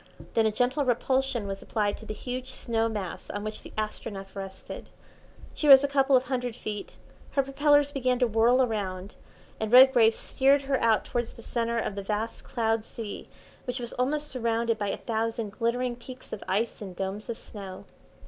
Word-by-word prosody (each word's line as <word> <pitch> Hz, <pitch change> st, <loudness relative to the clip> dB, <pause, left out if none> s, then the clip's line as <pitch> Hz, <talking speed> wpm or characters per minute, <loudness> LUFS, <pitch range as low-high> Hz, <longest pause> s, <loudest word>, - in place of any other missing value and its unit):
Then 225 Hz, -1 st, +3 dB
a -, -, +1 dB
gentle 250 Hz, +6 st, +1 dB
repulsion 260 Hz, -1 st, +1 dB
was 195 Hz, 0 st, -5 dB
applied 210 Hz, -2 st, -1 dB
to 220 Hz, -, -12 dB
the -, -, -3 dB
huge 255 Hz, +2 st, -5 dB
snow 230 Hz, -3 st, 0 dB
mass 200 Hz, -6 st, -5 dB
on 205 Hz, 0 st, -4 dB
which 215 Hz, 0 st, -5 dB
the -, -, -11 dB
Astronef 205 Hz, -2 st, -5 dB
rested. 195 Hz, -1 st, -8 dB, 0.6 s
She 300 Hz, -, -1 dB
rose 270 Hz, -1 st, +10 dB
a -, -, +3 dB
couple 275 Hz, -1 st, +3 dB
of 250 Hz, -, 0 dB
hundred 250 Hz, -2 st, -2 dB
feet, 210 Hz, -4 st, -6 dB, 0.4 s
her 275 Hz, -, +3 dB
propellers 285 Hz, +1 st, +3 dB
began 255 Hz, -3 st, +1 dB
to 250 Hz, -, +3 dB
whirl 235 Hz, +3 st, +4 dB
round, 200 Hz, -4 st, -4 dB, 0.5 s
and 220 Hz, 0 st, -2 dB
Redgrave 250 Hz, -3 st, +7 dB
steered 275 Hz, +1 st, +2 dB
her 270 Hz, -1 st, 0 dB
out 225 Hz, -2 st, +3 dB
towards 240 Hz, -1 st, -2 dB
the 230 Hz, -, -13 dB
centre 235 Hz, -1 st, -1 dB
of 225 Hz, -, -1 dB
the 200 Hz, -, -4 dB
vast 210 Hz, +3 st, -3 dB
cloud 225 Hz, -1 st, 0 dB
sea 220 Hz, -2 st, -7 dB, 0.4 s
which 250 Hz, +1 st, -3 dB
was 240 Hz, -1 st, -5 dB
almost 295 Hz, +4 st, -1 dB
surrounded 230 Hz, -2 st, 0 dB
by 205 Hz, -, -1 dB
a -, -, -2 dB
thousand 225 Hz, -1 st, -2 dB
glittering 240 Hz, +2 st, -1 dB
peaks 255 Hz, +1 st, -11 dB
of -, -, -5 dB
ice 210 Hz, +6 st, -1 dB
and 190 Hz, -3 st, -7 dB
domes 195 Hz, +4 st, -4 dB
of 230 Hz, -, -3 dB
snow. 195 Hz, -3 st, -8 dB
230 Hz, 185 wpm, -28 LUFS, 215-255 Hz, 0.6 s, rose